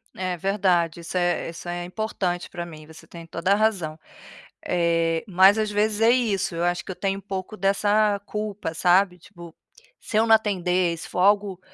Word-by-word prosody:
É 185 -1 -2
verdade 175 -3 0
isso 170 +2 -5
é 175 -1 0
isso 170 +1 -8
é 175 0 -4
importante 180 -2 -3
pra 175 0 -6
mim, 155 -2 -11
você 160 +1 -15
tem 170 -1 -11
toda 170 +3 0
a - - +4
razão. 195 -8 0 0.7
Eh, 165 -1 +1
mas 190 +3 +5
às 215 -1 0
vezes 210 +1 0
é 225 +1 +5
isso, 220 -8 0
eu 170 - -1
acho 175 0 -1
que - - -9
eu 185 - -6
tenho 195 0 -2
um - - -12
pouco 195 +1 -6
dessa 205 +1 +2
culpa 210 -6 -4
sabe 180 +2 +3
tipo, 170 -2 -13 0.5
se 215 - -5
eu 220 +1 +4
não 225 - +6
atender, 185 -5 +1
se - - -8
for - - -3
algo 200 -1 +2
185 Hz, 195 wpm, -24 LUFS, 175-205 Hz, 0.7 s, não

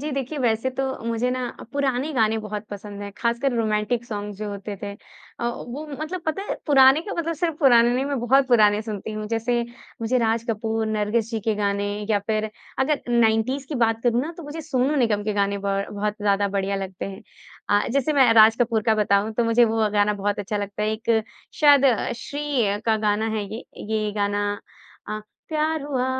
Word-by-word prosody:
जी, 300 +1 -3
देखिए 275 +2 -3
वैसे 235 +1 +1
तो 265 +1 -3 0.2
मुझे 230 +2 0
ना 255 0 -2 0.3
पुराने 280 +1 0
गाने 220 -2 +2
बहुत 210 0 -6
पसंद 205 0 -7
है, 200 - -6
खासकर 235 +2 0
रोमांटिक 225 +1 0
सॉन्ग्स 205 -3 -5
जो 210 0 -4
होते 200 0 -6
थे 200 -1 -4 0.5
अ, - - -2
वो 245 +5 -6
मतलब 310 +5 -5
पता 315 +5 -1
है - - 0
पुराने 270 0 +6
का 405 - -6
मतलब 335 0 -1
सिर्फ 330 0 -1
पुराने 240 -4 +5
नहीं 260 +2 0
मैं 280 -1 -2
बहुत 265 +3 +3
पुराने 210 -3 +4
सुनती 215 -1 -5
हूँ, 215 0 -4
जैसे 230 +2 0 0.4
मुझे 235 +3 +1
राज 230 -1 +1
कपूर, 220 0 -1
नरगिस 215 +1 0
जी 225 -2 -2
के 220 +1 0
गाने 200 -1 0 0.2
या 210 - +4
फिर 215 0 -1 0.3
अगर 280 +2 +1
90s 235 +3 +2
की 305 - -4
बात 225 -2 +1
करूँ 240 -1 +2
ना 320 +4 -5
तो 340 - -8
मुझे 295 +2 -6
सोनू 280 -2 0
निगम 225 -6 +2
के 215 - 0
गाने 200 0 0
बहु 200 0 -2
बहुत 210 +1 -1
ज़्यादा 200 0 +2
बढ़िया 195 0 -1
लगते 190 -1 -5
हैं। 195 0 -8 0.5
अ, 205 0 +3
जैसे 280 +3 +1
मैं 265 -5 +5
राज 220 0 +7
कपूर 230 -2 +2
का 220 +1 +3
बताऊँ 210 0 +2
तो 235 - +1
मुझे 230 +1 +4
वो 225 -1 +1
गाना 205 0 +3
बहुत 205 +1 -2
अच्छा 205 +1 -3
लगता 205 +1 -4
है 215 - +1
एक 220 0 +1 0.4
शायद 285 -2 +7 0.3
श्री 260 -7 -1
का 220 -1 +3
गाना 215 0 0
है 210 - -2
ये, 230 - -7
ये 215 -1 -2
गाना 205 0 0 0.6
अ, 215 0 -3 0.3
प्यार 310 0 0
हुआ 265 -3 -1
225 Hz, 200 wpm, -23 LUFS, 210-260 Hz, 0.6 s, राज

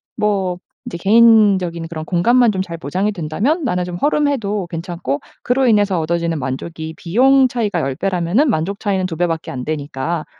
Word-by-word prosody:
뭐 195 -4 0 0.3
이제 170 - -5
개인적인 200 -5 +4
그런 160 -1 -6
공간만 230 +8 +3
좀 190 -2 -2
잘 170 -3 -6
보장이 185 +8 -2
된다면 205 - -1
나는 180 -8 0
좀 180 -1 -6
허름해도 230 -9 0
괜찮고 165 -4 -4 0.2
그로 255 +2 +1
인해서 205 -5 +3
얻어지는 170 0 -1
만족이 160 +5 -5
비용 260 +9 +4
차이가 210 -8 -1
10 135 -1 -2
배라면은 195 - +1
만족 195 +2 -1
차이는 195 -3 -1
2 165 - -5
배밖에 165 -2 -1
안 125 -1 -5
되니까 155 +1 -3
180 Hz, 365 characters per minute, -18 LUFS, 165-215 Hz, 0.3 s, 개인적인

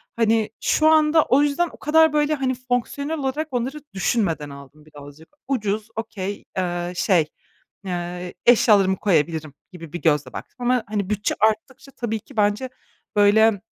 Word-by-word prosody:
Hani, 225 -1 +2
şu 310 - +2
anda 315 0 +5
o 270 +3 +3
yüzden 295 +4 +1
o - - -14
kadar, 320 +1 +4
böyle, 300 0 +2
hani, 260 -2 -1
fonksiyonel 255 +5 -2
olarak 285 +3 -2
onları 255 +4 -2 0.2
düşünmeden 175 -7 -1
aldım 140 +2 -13
bir 155 - -21
de - - -14
alacak 145 +3 -13 0.2
Ucuz, 215 -5 -1
okay 205 -3 -5
eee, 175 -1 -2
şey, 175 -3 +2 0.6
eee, 175 0 -5
eşyalarımı 205 -5 +5
koyabilirim 160 -5 0 0.2
gibi 165 -4 -11
bir 175 - -5
gözle 150 -5 +1
baktım. - - -9
Ama, 245 -1 +1
hani, 205 -2 -3
bütçe 210 -1 -1
arttıkça 260 +5 -1
tabii 225 -3 -3
ki 245 +4 -18
bence, 210 +5 +1 0.5
böyle, 205 0 +4
215 Hz, 155 wpm, -22 LUFS, 175-260 Hz, 0.6 s, anda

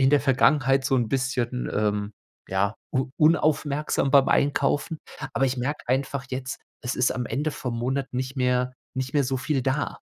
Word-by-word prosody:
in 135 0 +5
der 145 -1 +5
Vergangenheit 135 0 +3
so 135 - +2
'n 120 -3 +1
bisschen, 125 -1 -1
ähm, 105 0 0 0.4
ja, 100 +2 +1 0.2
u 130 0 0
unaufmerksam 150 -3 +2
beim 140 -1 +6
Einkaufen. 145 +2 +1 0.4
Aber 135 - +2
ich 130 0 -1
merke 145 +5 -2
einfach 135 +1 -1
jetzt, 130 0 -4 0.2
es 125 - -2
ist 125 - +2
am 125 -2 -2
Ende 150 +3 -1
vom 125 -5 -4
Monat 135 +3 -1
nicht 130 +2 -3
mehr 125 0 +1 0.2
nicht 130 +1 -2
mehr 145 -2 +3
so 130 +1 -1
viel 135 +2 -1
da. 135 +3 -1
130 Hz, 180 wpm, -25 LUFS, 125-140 Hz, 0.4 s, beim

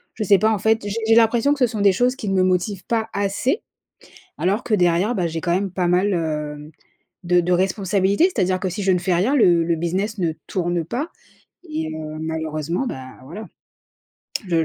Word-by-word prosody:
je 220 - -2
sais 200 -1 +5
pas 220 +3 +3
en 210 - 0
fait. 220 +2 +2
J'ai 205 - -3
j'ai 225 - +5
l'impression 235 +5 +4
que 290 - -6
ce 250 - +4
sont 220 -3 -4
des 200 -2 +5
choses 250 +5 +1
qui 220 -7 -5
ne 195 - 0
me 185 - +3
motivent 185 +1 0
pas 225 -1 -1
assez, 200 - -1 0.7
alors 200 +6 0
que 230 - -2
derrière, 180 +4 +2
bah 175 -2 0
j'ai 165 0 -4
quand 170 0 0
même 195 -1 -1
pas 180 -2 -1
mal, 185 +3 +2
heu, 150 -2 -3 0.5
de 175 0 +3
de 180 +1 0
responsabilités. 190 - +2
C'est-à-dire 185 -3 +1
que 185 - -1
si 190 +4 -4
je 190 - +2
ne 180 - +2
fais 180 0 0
rien 210 +12 +2
le 175 -9 +5
le 165 0 0
business 190 +6 -2
ne 170 -3 0 0.2
tourne 175 -2 -1
pas 260 - -3 0.6
et 305 - -3
heu, 155 -1 -6
malheureusement, 160 - -3
ben, 130 - -6 0.2
voilà. 190 +10 -8 1.0
Le 165 -2 +2
185 Hz, 210 wpm, -21 LUFS, 170-215 Hz, 1.0 s, sais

